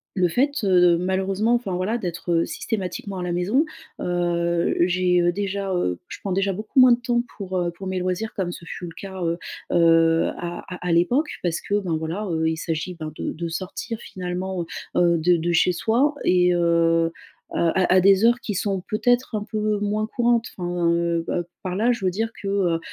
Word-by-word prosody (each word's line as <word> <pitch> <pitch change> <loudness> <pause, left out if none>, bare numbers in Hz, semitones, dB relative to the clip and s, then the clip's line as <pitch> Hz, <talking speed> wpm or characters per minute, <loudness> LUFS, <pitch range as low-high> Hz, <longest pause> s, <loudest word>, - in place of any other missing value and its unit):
le 185 -2 +3
fait, 255 - +1
heu, 180 -2 +5
malheureusement, 190 +5 0
enfin 235 -6 -2
voilà 190 +6 -1
d'être 170 -4 -1
systématiquement 195 -2 -4
à - - -3
la 180 - -2
maison, 190 - +2 0.4
heu, 170 -1 0
j'ai, 180 0 +3
heu, 175 0 +3
déjà, 195 0 -2
heu 90 - -1
je - - -8
prends 195 - -3
déjà 195 +1 +1
beaucoup 215 +8 -1
moins 255 -1 +8
de 240 - +4
temps 240 0 0
pour, 190 -2 -4
heu, 175 -1 0
pour 190 +3 -8
mes 185 0 -2
loisirs 185 +4 -2
comme 185 -3 -2
ce 170 - -10
fut 175 - -7
le - - -8
cas, 190 -1 -7
heu, 170 0 0 0.3
heu, 165 -1 +4
à 175 0 -5 0.2
à 180 - -10
à - - +1
l'époque. 240 - +2
Parce 170 -2 -1
que, 200 - -1
ben, 180 -5 -2
voilà, 165 +7 -3
heu, 160 -1 0
il 160 - -2
s'agit 165 +2 -3
ben 155 0 -5
de - - -3
de 170 +1 -4
sortir 185 +6 -5
finalement, 180 0 -4 0.3
heu, 170 -1 +4
de 175 +2 +3
de 170 +1 -1
chez 170 +2 +4
soi 235 - +1
et 180 0 +4
heu, 165 -1 +2 0.4
à 180 +2 +2
à 185 - +6
des 195 +3 +5
heures 240 +1 +4
qui 210 - -4
sont 195 0 -1
peut-être 245 +2 +1
un 210 - -2
peu 215 -1 -1
moins 210 +1 -1
courantes. 235 0 +1
Enfin 175 -1 0
heu, 170 0 0
heu, 175 - -1 0.2
par 185 -1 -3
là, 225 +5 +2
je 235 -5 -3
veux - - +4
dire 225 +5 -1
que, 200 - -5
heu, 185 -4 +1
180 Hz, 205 wpm, -23 LUFS, 170-205 Hz, 0.4 s, moins